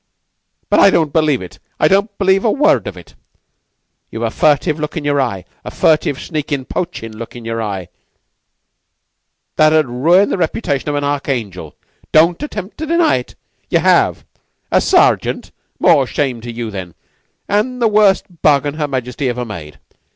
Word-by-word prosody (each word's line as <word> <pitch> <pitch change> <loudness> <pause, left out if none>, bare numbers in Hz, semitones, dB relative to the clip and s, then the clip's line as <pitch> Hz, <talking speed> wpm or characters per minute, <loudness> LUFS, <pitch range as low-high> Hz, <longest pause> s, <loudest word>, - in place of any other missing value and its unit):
But - - +3
I - - +7
don't 160 -6 +1
believe 155 - +2
it 90 - -12 0.2
I - - +4
don't 200 +1 +1
believe 195 -1 +2
a 230 - +2
word 295 +7 +2
of - - -6
it. - - -14 1.0
Ye've - - -5
a - - -1
furtive 150 +1 +1
look 150 +2 -4
in 150 - -4
your 145 -1 +2
eye 100 -8 -3 0.2
a - - -6
furtive, 155 -3 +1
sneakin', 145 -5 -3
poachin' 145 -12 -5
look 115 +2 -9
in 120 -2 -9
your 115 0 -3
eye, 100 -5 -4 1.7
that 155 0 +5
'ud 155 -1 +4
ruin 165 +11 +3
the - - -2
reputation 155 - -1
of 145 - -1
an 145 - -1
archangel! 120 - -3 0.4
Don't 165 - +4
attempt 210 -8 -6
to 315 - -4
deny 335 - +3
it! 125 - -8 0.3
Ye - - +3
have! - - +2 0.5
A - - +4
sergeant? - - +2 0.3
More - - +4
shame 130 -5 -2
to 120 +1 -7
you, 115 -1 -5
then, 95 -4 -7 0.5
an' 215 +5 0
the 235 -2 +2
worst 210 -2 +3 0.2
bargain 145 -1 +3
Her 150 - 0
Majesty 130 -1 -3
ever 125 0 -3
made! 75 - -9
145 Hz, 170 wpm, -16 LUFS, 120-180 Hz, 1.7 s, I